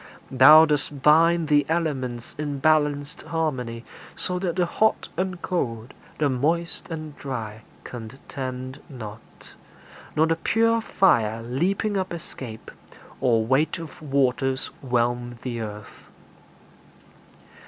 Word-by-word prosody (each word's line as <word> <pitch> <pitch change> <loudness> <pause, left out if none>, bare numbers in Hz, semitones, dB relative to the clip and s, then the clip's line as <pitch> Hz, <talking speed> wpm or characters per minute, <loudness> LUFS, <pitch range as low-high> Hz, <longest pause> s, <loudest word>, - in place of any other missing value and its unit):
Thou 150 +5 +9
dost 145 -2 -2
bind 165 +2 +5
The 145 -1 +4
elements 135 -8 -2
in 145 -2 -2
balanced 150 0 +1
harmony, 125 -8 -3 0.3
So 180 0 -3
that 180 -3 -2
the 180 -1 +2
hot 220 +5 +1
and 185 0 -2
cold, 115 -10 -2 0.2
the 150 - +2
moist 165 +8 -1
and 155 -3 -6
dry, 110 -6 -5 0.2
Contend 130 +2 -7
not; 110 -5 -10 0.7
nor 155 - +4
the 165 0 +1
pure 230 +5 +2
fire 115 - +2
leaping 190 - 0
up 190 -1 -2
Escape, 130 -9 -8 0.5
or 115 -4 +2
weight 140 +7 +2
of 165 -2 -9
waters 135 -2 0
whelm 120 -1 -1
the 120 -2 -3
earth. 105 -2 -9
140 Hz, 115 wpm, -24 LUFS, 120-165 Hz, 0.7 s, Thou